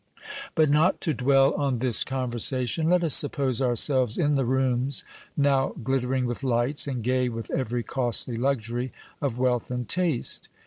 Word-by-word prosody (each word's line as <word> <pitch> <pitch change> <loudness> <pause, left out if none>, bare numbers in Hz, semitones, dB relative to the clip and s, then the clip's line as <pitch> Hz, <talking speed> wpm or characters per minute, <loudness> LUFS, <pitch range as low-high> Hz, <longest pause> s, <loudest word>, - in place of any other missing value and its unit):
But 155 -2 +3
not 155 +5 +2
to 160 - +1
dwell 135 +1 +2
on 140 -3 -1
this 120 -1 +4
conversation, 130 +4 -1
let 180 0 +2
us 160 -5 +3
suppose 135 -3 +2
ourselves 125 -1 +2
in 150 -3 +1
the 135 -2 0
rooms 130 +1 0 0.3
now 140 -2 +1
glittering 130 +1 -1
with 120 +1 -4
lights, 130 +3 +1
and 125 -4 -4
gay 125 +1 0
with 115 -1 -7
every 120 -2 -2
costly 120 0 0
luxury 120 -1 -2 0.3
of 135 -5 -2
wealth 125 -2 -1
and 125 -2 -4
taste. 170 -9 -1
130 Hz, 155 wpm, -25 LUFS, 120-140 Hz, 0.3 s, this